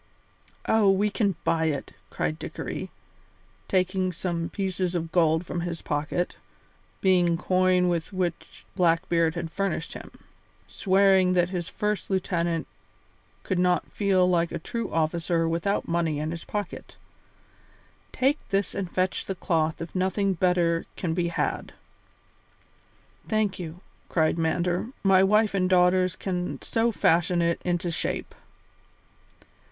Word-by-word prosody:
"Oh, 220 -3 +4
we 200 +2 +2
can 200 -3 +1
buy 160 -1 +1
it," 150 -3 -2 0.2
cried 75 0 -2
Dickory, - - -5 0.8
taking 185 0 +1
some 170 -1 -3
pieces 185 -2 -2
of 165 -1 -2
gold 165 -1 +3
from 170 - -3
his 170 -1 -4
pocket, 150 +4 -2 0.6
being 175 -3 +3
coin 185 0 +2
with 170 0 -1
which 180 -3 -4
Blackbeard 165 -2 +2
had 170 -1 -4
furnished 195 -4 -2
him, - - -9 0.6
swearing 190 -1 +3
that 175 -1 +2
his 175 -1 -3
first 210 0 -2
lieutenant 170 -3 0 0.8
could 185 -2 -1
not 180 0 +1
feel 190 -3 +2
like 170 -2 +2
a 170 - -2
true 230 +8 -4
officer 165 +1 0
without 170 +5 -1
money 165 -3 0
in 155 +2 -2
his 165 -1 -6
pocket; 205 -3 -5 1.2
"take 275 +4 +1
this 195 -1 0
and 190 -3 -3
fetch 185 +1 -1
the 195 - -2
cloth 160 -3 0
if 165 - -10
nothing 190 +1 +1
better 175 -2 +1
can 170 -3 -1
be 170 0 0
had." 170 - -2 1.6
"Thank 215 -3 0
you," 170 0 -7 0.3
cried 160 0 +1
Mander; 175 +4 0 0.2
"my 195 -1 +5
wife 210 +2 +3
and 185 -2 +1
daughters 185 0 +4
can 180 -2 -3
soon 230 +1 +1
fashion 175 -3 +2
it 170 0 0
into 175 0 -1
shape." 165 - -3
180 Hz, 135 wpm, -26 LUFS, 170-190 Hz, 1.6 s, my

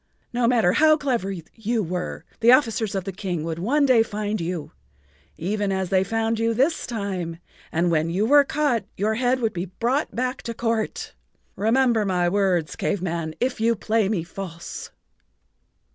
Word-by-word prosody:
No 240 -1 +2
matter 230 -7 +4
how 310 +7 +5
clever 245 -10 -1 0.2
you 225 0 -1
were, 180 +1 -4
the 230 +1 +6
officers 230 -5 +3
of 190 - -1
the 195 - -4
King 180 -4 -3
would 165 0 -4
one 280 - +2
day 255 -4 +5
find 210 -2 -2
you—even 160 - -5
as 190 -2 -1
they 190 0 +3
found 225 +2 -1
you 230 0 +1
this 280 +8 +1
time—and 175 -5 -3
when 160 0 +1
you 190 +5 +1
were 285 +4 +6
caught 280 -6 0
your 210 +3 +1
head 250 +3 +1
would 225 -2 0
be 175 +1 -3
brought 235 - -1
back 255 +2 -2
to 230 - -5
court. 225 -2 -2 0.4
Remember 230 +2 +2
my 180 -3 +1
words, 180 -3 +1
Cave 190 - -1
Man, 165 -3 -3
if 250 -2 -1
you 230 +1 +3
play 220 -1 +1
me 195 -7 0
false." 170 -1 -7
210 Hz, 165 wpm, -24 LUFS, 180-235 Hz, 0.4 s, the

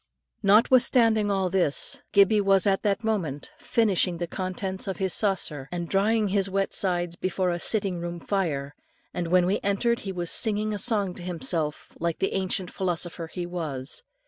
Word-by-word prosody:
Notwithstanding 225 0 +4
all 190 -2 0
this, 180 -7 +1
Gibbie 200 +1 +5
was 195 -1 +4
at 195 -1 +2
that 205 +1 0
moment 175 -11 -2
finishing 195 -6 +1
the 175 - -2
contents 190 +2 -4
of 190 - -3
his 190 -2 0
saucer, 160 -9 0
and 175 -1 -3
drying 210 +3 +2
his 195 0 +1
wet 195 0 -1
sides 175 -3 0
before 185 0 -1
the 175 - -3
sitting 195 -3 0
room 170 0 -5
fire, 150 -8 -2 0.4
and 175 -1 -2
when 180 +1 +4
we 190 +3 +1
entered, 235 +4 +1
he 195 - -5
was 175 -2 -3
singing 215 0 0
a 205 - -3
song 205 -5 0
to 180 - -10
himself, 160 -3 -3
like 170 -1 -1
the 195 - -1
ancient 190 -1 -2
philosopher 175 -2 -3
he 175 +2 -5
was. 155 -6 -5
190 Hz, 170 wpm, -26 LUFS, 175-200 Hz, 0.4 s, Gibbie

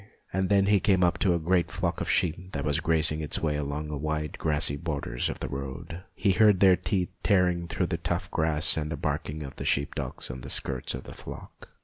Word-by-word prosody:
And 95 0 0
then 100 -1 +4
he 100 0 +4
came 95 -1 +3
up 85 -1 +2
to 90 -3 +3
a - - 0
great 85 +2 +1
flock - - -2
of - - -2
sheep 90 +3 0
that 70 0 -2
was 75 -2 +2
grazing 80 -1 +2
its 75 - 0
way 75 -2 0
along 75 +1 -3
the 75 -2 -4
wide 75 0 -3
grassy 75 -1 +1
borders 70 -6 -2
of - - -5
the - - -3
road. 70 +5 -6
He 100 - +2
heard 105 0 +5
their 95 -1 +7
teeth 90 0 -1
tearing 90 -4 +2
the - - -1
tough - - -2
grass, 80 0 +2
and 75 0 -2
the 80 - -3
barking 75 +1 -3
of 70 -1 -9
the - - -5
sheep 70 +1 +1
dogs - - -4
on 65 0 -8
the 65 - -7
skirts 65 -2 -1
of 65 - -7
the - - -10
flock. - - -11
80 Hz, 230 wpm, -28 LUFS, 75-90 Hz, -, their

